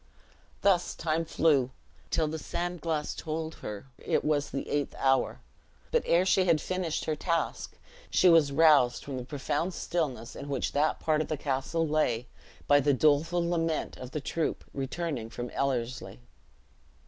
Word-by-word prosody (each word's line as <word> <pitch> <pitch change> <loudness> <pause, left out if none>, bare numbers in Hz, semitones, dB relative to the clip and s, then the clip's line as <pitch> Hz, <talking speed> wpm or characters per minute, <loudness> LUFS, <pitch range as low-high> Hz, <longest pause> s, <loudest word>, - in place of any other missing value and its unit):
Thus 185 -3 +2
time 165 0 -1
flew, 145 -6 +2 0.4
till 160 - +1
the 160 +1 -4
sand 175 +1 -4
glass 155 -2 -1
told 160 0 -4
her 105 +1 -6
it - - 0
was 145 -1 +1
the 135 - -4
eighth 145 -1 -1
hour. 135 0 +1 0.5
But 475 - +3
ere 175 +2 +4
she 190 0 +3
had 165 -3 +4
finished 185 -1 -2
her 155 - 0
task, 165 +2 -2 0.3
she - - +4
was 165 -5 +6
roused 145 -5 +4
from 135 -2 -4
the 125 - -4
profound 145 +6 -2
stillness 140 -8 -2
in 140 - -7
which 135 -3 -1
that 150 +2 +1
part 155 -1 +1
of - - -3
the 155 - -2
castle 145 +4 -1
lay, 125 -6 +1 0.4
by 145 0 +5
the 145 0 +3
doleful 155 +5 +2
lament 165 -2 -1
of 130 - -8
the 150 +3 -4
troop 160 +3 -2
returning 135 -3 -3
from 120 +1 -6
Ellerslie. 125 - -2
155 Hz, 160 wpm, -29 LUFS, 135-165 Hz, 0.5 s, was